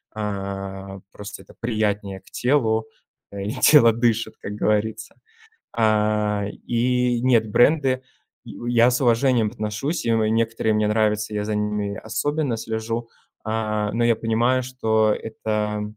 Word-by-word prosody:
Э, 95 -2 -5
просто 105 +2 -9
это - - -18
приятнее 105 -4 -2
к - - -22
телу, 115 -5 +1 0.4
э, 100 -1 -6
и 105 - -3
тело 125 -2 +6
дышит, 115 -1 0
как 105 - -6
говорится. 105 +1 -1 0.6
А, 105 -2 +1 0.2
и 125 0 +1
нет, 115 -4 +3
бренды, 130 +2 +3 0.4
и - - -10 0.2
я 120 +1 +5
с 125 - 0
уважением 120 -2 +3
отношусь, 110 +8 -3
и 115 - +2
мо 110 -1 +2
некоторые 115 0 +1
мне 105 0 +2
нравятся. 105 0 0
Я 105 0 -1
за 105 0 -2
ними 105 -1 -2
особенно 145 +2 -2
слежу, 115 +1 -4 0.4
а, 105 -1 -1
но 115 - 0
я 115 -1 +3
понимаю, 115 +3 +1
что 110 -4 +1
это, 105 -1 -3
110 Hz, 140 wpm, -23 LUFS, 105-120 Hz, 0.6 s, тело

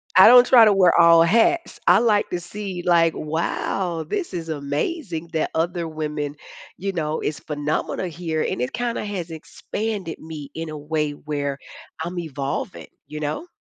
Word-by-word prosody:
I 185 - +9
don't 245 +1 +9
try 240 -3 +7
to 210 - +5
wear 185 -3 +4
all 170 -1 +7
hats. 230 - +2
I - - +7
like 215 -3 +2
to 180 - -1
see, 190 0 -6
like, 165 -2 +4
"Wow. 165 +2 -2
This 340 - -4
is 165 -2 -5
amazing 160 - -3
that 160 - -1
other 170 +1 -1
women," 150 -2 -4 0.4
you 195 +1 -3
know, 155 -3 -2
"it's 145 -2 -3
phenomenal 150 +4 -3
here." 165 -2 -3
And - - -2
it 125 - -2
kinda 240 -2 -2
has 190 -5 -4
expanded 190 +3 -5
me 155 -3 -8
in 165 0 -5
a 155 - -6
way 150 0 -2
where 145 -1 -4 0.4
I'm 175 +2 -5
evolving. 140 -5 -4 0.2
You 150 - -7
know? 155 - -3
165 Hz, 170 wpm, -22 LUFS, 150-190 Hz, 0.4 s, I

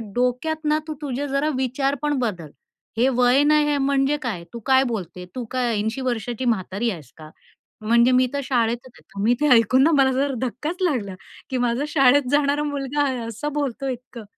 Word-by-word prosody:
डोक्यात 250 +6 -1
ना 300 0 +3
तू 310 - -3
तुझे 285 0 -3
जरा 280 +2 0
विचार 265 +2 0
पण 295 0 0
बदल. 180 - -3 0.5
हे 240 +3 +3
वय 250 +3 +4
नाही 300 0 +4
हे 290 - +1
म्हणजे 275 +1 +1
काय? 210 -10 -4
तू 235 - -6
काय 265 0 +5
बोलते? 185 -7 -5
तू 250 - -3
काय 250 -2 0
80 220 +5 -2
वर्षाची 245 -1 -3
म्हातारी 220 0 -1
आहेस 155 - -10
का?" 155 -1 -11 0.5
म्हणजे 235 +3 +4
मी 255 0 +4
तर 280 - -1
शाळेतच 240 -2 0
आहे. - - -19
तर 200 - -9
मी 230 +3 +4
ते 300 - +3
ऐकून 240 +3 +4
ना 320 - +4
मला 265 -1 +3
जरा 275 +2 0
धक्काच 300 +8 -5
लागला. 245 - -1 0.3
की 260 - -2
माझा 245 +2 0
शाळेत 275 -2 +4
जाणारा 290 0 +2
मुलगा 285 0 -1
आहे 265 -3 -1
असं 230 +7 -5
बोलतोय 275 -2 -2
इतकं! 245 -1 -11
255 Hz, 195 wpm, -22 LUFS, 235-285 Hz, 0.5 s, काय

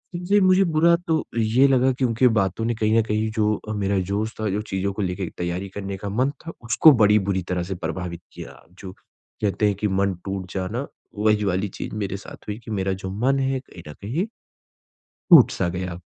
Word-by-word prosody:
जी, 180 +4 +2
मुझे 185 0 +5
बुरा 170 +1 +4
तो 160 -1 +1
ये 115 +5 +4
लगा 130 -1 +3
क्योंकि 125 -1 +2
बातों 110 -2 0
ने 120 - 0
कहीं 110 0 +2
न - - +5
कहीं 110 0 -1
जो 105 -1 +1 0.2
अ, - - -2
मेरा 100 -1 0
जोश 105 +2 -1
था, 110 -1 -1
जो 100 +2 -1
चीज़ों 100 -2 -3
को 105 - -4
लेके 95 0 -2
एक 85 - -5
तैयारी 90 +2 -3
करने 100 0 -6
का 100 +1 -5
मन 130 +7 +1
था 165 - -5
उसको 140 +6 +6
बड़ी 105 0 +6
बुरी 95 -1 0
तरह 90 -1 -1
से 95 +2 -5
प्रभावित 85 0 -5
किया। - - -10 0.2
जो 95 - -8
कहते 105 +1 -4
हैं 100 - +1
कि 105 - 0
मन 100 0 +1
टूट 95 -1 -5
जाना, 105 +8 -3 0.3
वही 105 0 +2
वाली 95 +1 0
चीज़ - - -6
मेरे 100 -2 -3
साथ 100 - -13
हुई 105 0 -4
कि 110 - -7
मेरा 95 -1 -1
जो 95 0 -6 0.2
मन 135 +1 +3
है 135 0 0
कहीं 90 -9 -14
न 75 - -8
कहीं 130 - -2 1.1
टूट-सा 125 - +6
गया। 90 0 -5
105 Hz, 210 wpm, -23 LUFS, 95-120 Hz, 1.1 s, उसको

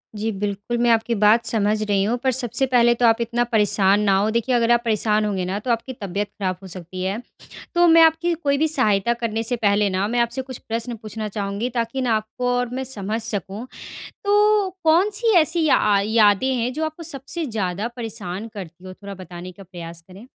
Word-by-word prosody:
जी। 220 +2 -2
बिल्कुल, 205 +3 -3
मैं 240 0 +2
आपकी 230 +1 +1
बात 220 +3 +5
समझ 215 -1 0
रही 200 -2 +1
हूँ 235 +4 0
पर 260 - +3
सबसे 255 +1 0
पहले 240 -2 +4
तो 240 - +1
आप 225 +1 +4
इतना 235 +1 0
परेशान 210 -3 +3
ना 200 -2 +3
हो, 205 +2 +1
देखिए 235 +2 0
अगर 235 0 +2
आप 235 0 +4
परेशान 215 -1 +1
होंगे 190 -3 -2
ना 190 +2 -2
तो 240 +2 -2
आपकी 235 +3 -2
तबियत 200 -1 -4
ख़राब 190 -3 -4
हो 190 - -8
सकती 185 +1 -7
है। 200 +5 -2 0.5
तो 345 0 +5
मैं 330 0 +7
आपकी 325 +2 +4
कोई 285 -4 0
भी 315 +2 +2
सहायता 235 -7 +2
करने 230 -1 -3
से 245 +2 +1
पहले 205 -2 +2
ना 190 +2 -1
मैं 240 +2 -1
आपसे 235 +2 0
कुछ 260 -1 -8
प्रश्न 230 +1 -4
पूछना 215 0 -6
चाहूँगी 200 +3 -3
ताकि 235 +2 -2
ना 235 -3 +1
आपको 220 +3 -2
और 245 -1 -1
मैं 265 +1 -3
समझ 220 -3 -4
सकूँ। 205 0 -3 0.6
तो 415 -1 +3
कौन-सी 400 +8 +3
ऐसी 320 0 +1
अ, - - +4
या 205 -1 +3
यादें 220 +3 +3
हैं 245 +1 -1
जो 315 +4 -2
आपको 315 +2 -5
सबसे 310 +2 -5
ज़्यादा 205 -2 -2
परेशान 220 -3 -5
करती 180 -2 -9
हो? 185 - -8
थोड़ा 200 +1 -9
बताने 180 0 -9
का 195 - -14
प्रयास 170 -2 -10
करें। 200 +7 -13
225 Hz, 210 wpm, -22 LUFS, 200-250 Hz, 0.6 s, मैं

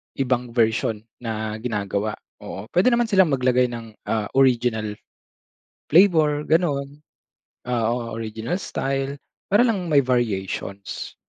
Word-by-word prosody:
ibang 125 -2 -1
version 110 -2 +1 0.2
na 110 -2 -4
ginagawa? 105 -2 -2 0.2
Oo, - - -7
pwede 180 +7 +3
naman 240 -1 +1
silang 190 -2 +5
maglagay 125 -1 +3
ng, 115 -2 -7 0.2
ah, 110 -2 -1
original 120 -5 +2 0.9
flavor, 155 -4 +4
ganun. 145 -4 0 0.7
Ah, 120 -2 0
o 120 -1 -3
original 110 +6 -4
style, 135 +1 -2 0.3
para 210 +5 +5
lang 190 -7 -1
may 145 -2 +6
variations. 100 -6 -2
125 Hz, 115 wpm, -23 LUFS, 110-145 Hz, 0.9 s, may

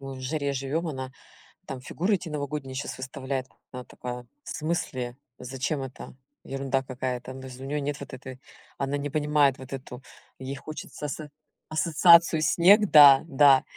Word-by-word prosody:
мы 135 -1 -7
в - - -9
жаре 140 +1 -2
живём, 140 +5 -2
она 130 -3 -5 0.5
там 135 -2 -6
фигуры 185 +10 -1
эти 175 -3 -6
новогодние 140 -2 -4
щас 130 - -4
выставляет. 130 0 -4 0.2
Она 125 -1 -7
такая: 125 0 -7 0.2
"В - - -10
смысле? 130 -6 -3 0.2
Зачем 135 +3 -3
это? 130 -1 -8 0.3
Ерунда 135 0 -2
какая-то!" 125 0 -4
Ну, 130 - -9
то 130 - -8
есть, 130 -1 -11
у 135 - -7
неё 145 +2 -2
нет 145 0 -3
вот - - -9
этой 130 0 -9 0.4
она 140 +1 -1
не 145 +1 -3
понимает 150 -2 +2
вот 130 +1 -10
эту 130 -1 -8 0.3
ей 130 +1 -6
хочется 150 +1 -7
со 150 +2 -6 0.4
ассоциацию 165 +1 +5
снег 190 +7 +6
Да, 140 -3 +9
да. 140 -3 +6
135 Hz, 170 wpm, -27 LUFS, 130-150 Hz, 0.5 s, Да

